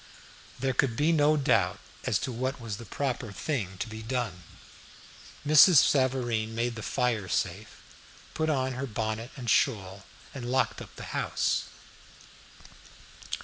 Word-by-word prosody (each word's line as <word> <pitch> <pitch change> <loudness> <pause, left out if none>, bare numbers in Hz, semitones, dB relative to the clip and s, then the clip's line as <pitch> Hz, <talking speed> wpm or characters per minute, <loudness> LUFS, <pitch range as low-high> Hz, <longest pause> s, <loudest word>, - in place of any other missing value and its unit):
There 135 -1 0
could 120 -3 +1
be 155 +3 +3
no 155 -1 +4
doubt 100 -10 +2 0.3
as - - +2
to 130 - -4
what 130 +3 -3
was 110 -4 -5
the 120 -1 -10
proper 125 -5 -2
thing 100 - -3
to 110 - -3
be 110 0 -8
done. 110 -6 -3 1.0
Mrs. 155 +4 +8
Savareen 125 -5 +3
made 120 +1 0
the 115 - -7
fire 115 -5 0
safe, - - -3 0.5
put 160 0 0
on 130 -3 0
her 130 +2 -4
bonnet 110 +1 -3
and 125 -3 -7
shawl 100 -6 +1 0.3
and 120 -3 -6
locked 130 0 +1
up - - -11
the - - -8
house. - - 0
120 Hz, 145 wpm, -28 LUFS, 110-135 Hz, 1.0 s, Mrs